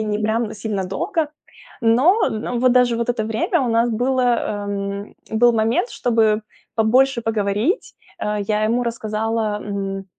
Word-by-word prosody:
и 220 - -1
не 210 0 -1
прям 220 +1 0
сильно 205 -2 -3
долго. 295 - -2 0.5
Но 260 - +4
в 230 +2 -3
вот 255 -1 +4
даже 250 -2 +3
вот 235 +1 -2
это 230 -3 0
время 220 +5 0
у 245 - 0
нас 230 +1 +2
было, 255 +3 +1 0.5
эм, 200 0 -4 0.2
был 240 +2 +4
момент, 225 - +1
чтобы 220 -2 +1 0.3
побольше 245 +3 +3
поговорить, 220 - -1 0.3
э. 210 -1 -1
Я 215 0 +1
ему 235 +3 +1
рассказала, 220 -1 -2
м, 195 -1 -4
225 Hz, 155 wpm, -21 LUFS, 210-240 Hz, 0.5 s, Но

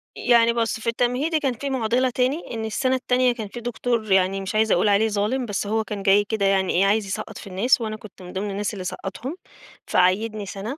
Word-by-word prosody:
يعني 235 -1 +4
بُص، 230 -2 -1
في 220 - -8
التمهيدي 250 +7 +1
كان 275 -4 0
في 280 +4 -5
مُعضِلة 255 0 +1
تاني، 255 +6 0
إن 225 -1 -3
السَنة 255 +4 0
التانية 255 -1 +2
كان 225 -3 -6
في 240 - -8
دكتور 235 -2 -2
يعني 190 +1 +3
مش 195 +2 -5
عايزة 220 0 +3
أقول 205 +4 +2
عليه 205 +2 +3
ظالم، 215 +5 -1
بس 205 -2 -3
هو 220 +1 0
كان 205 -1 -6
جاي 200 +1 +5
كده 210 -1 -1
يعني 190 -1 +2
إيه، 190 +3 +3
عايز 210 +1 +2
يسقّط 215 +2 -5
في - - -10
الناس 200 +7 +2
وأنا 215 -1 -3
كنت 215 -3 -14
من 180 0 -10
ضِمن 200 +2 -3
الناس 205 +2 -2
اللي 195 -3 -6
سقّطهم، 200 - -5 0.5
فعيِّدني 205 +4 +1
سَنة، 200 +8 -6
220 Hz, 225 wpm, -23 LUFS, 200-245 Hz, 0.5 s, جاي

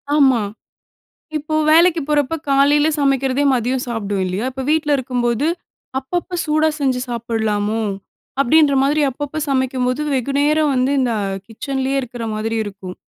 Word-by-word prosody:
ஆமா. 265 -5 +4 1.0
இப்போ 305 +1 -3 0.2
வேலைக்கு 335 +1 +5
போறப்போ 295 +1 +1
காலையில 285 +2 +4
சமைக்கிறதே 275 -1 +1
மதியம் 250 +1 0
சாப்பிடுவோம் 205 -5 -2
இல்லையா? 185 +5 -2
இப்ப 265 +1 -5
வீட்ல 310 -1 +1
இருக்கும்போது, 245 0 -1 0.5
அப்பப்போ 350 +7 -4
சூடா 310 0 +2
செஞ்சு 260 -3 +1
சாப்பிடலாமோ! 220 -2 -1 0.6
அப்படின்ற 285 +2 +4
மாரி 295 +2 +2
அப்பப்ப 290 +3 -5
சமைக்கும்போது 260 0 0
வெகுநேரம் 285 +4 +1
வந்து 255 +1 +1
இந்த 250 -2 +1 0.3
கிச்சன்லேயே 265 +4 -2
இருக்கிற 245 -2 -6
மாதிரி 225 +1 -2
இருக்கும். 190 -3 -8
265 Hz, 125 wpm, -19 LUFS, 235-290 Hz, 1.0 s, வேலைக்கு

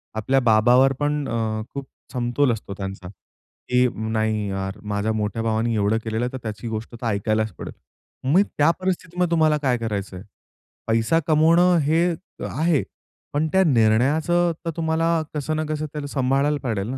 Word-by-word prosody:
आपल्या 130 +5 +2
बाबावर 125 +3 +4
पण 145 -1 0
अ, 110 -1 -1
खूप 140 -1 -6 0.3
समतोल 125 +2 +1
असतो 105 -3 -5
त्यांचा, 95 -2 -6 0.6
की 125 0 +4 0.2
"नाही 110 -1 0
यार! 95 +1 -4
माझ्या 105 +1 -1
मोठ्या 110 +1 -2
भावाने 115 +1 0
एवढं 105 +1 +2
केलेलं 110 +1 -1
आहे 125 - -5
तर - - -3
त्याची 110 +1 -5
गोष्ट 110 +1 -5
तर 120 - -8
ऐकायलाच 110 +1 0
पडेल." - - -7 0.6
मग 175 +7 +5 0.2
त्या 150 +2 +5
परिस्थितीमध्ये 180 -1 -1
तुम्हाला 155 -2 +3
काय 130 -4 +1
करायचं 105 -4 -4
आहे? 90 - -9 0.6
पैसा 115 +8 +2
कमावणं 170 +3 +4
हे 160 +4 +2 0.4
आहे 160 -2 +1 0.5
पण 150 +2 +1
त्या 190 0 +5
निर्णयाचं 150 +7 +3
तर - - -1
तुम्हाला 160 0 0 0.3
कसं 155 +1 -2
ना 155 - -1
कसं 155 0 -2
त्याला 150 -2 -4
सांभाळायला 140 +2 +1
पडेल 110 -5 -2
ना 130 - -3
125 Hz, 165 wpm, -23 LUFS, 110-155 Hz, 0.6 s, मग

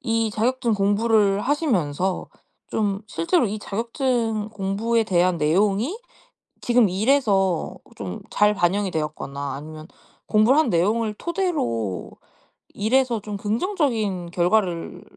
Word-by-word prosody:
이 225 -4 0
자격증 235 +2 0
공부를 205 0 +2
하시면서 190 - 0 0.4
좀 200 -2 -1
실제로 335 - +1
이 210 +2 -3
자격증 230 0 -1
공부에 210 +3 0
대한 180 -3 +2
내용이 200 - +1 0.6
지금 240 -3 +3
일에서 195 - +1 0.2
좀 95 -3 -6
잘 210 0 +3
반영이 195 +1 +1
되었거나 145 -3 -4
아니면 155 +2 -9 0.4
공부를 225 +7 +4
한 315 - +1
내용을 210 +6 +1
토대로 120 - -2 0.6
일에서 235 +2 +1
좀 205 0 -6
긍정적인 215 - -1
결과를 175 -1 0
210 Hz, 255 characters per minute, -23 LUFS, 180-235 Hz, 0.6 s, 공부를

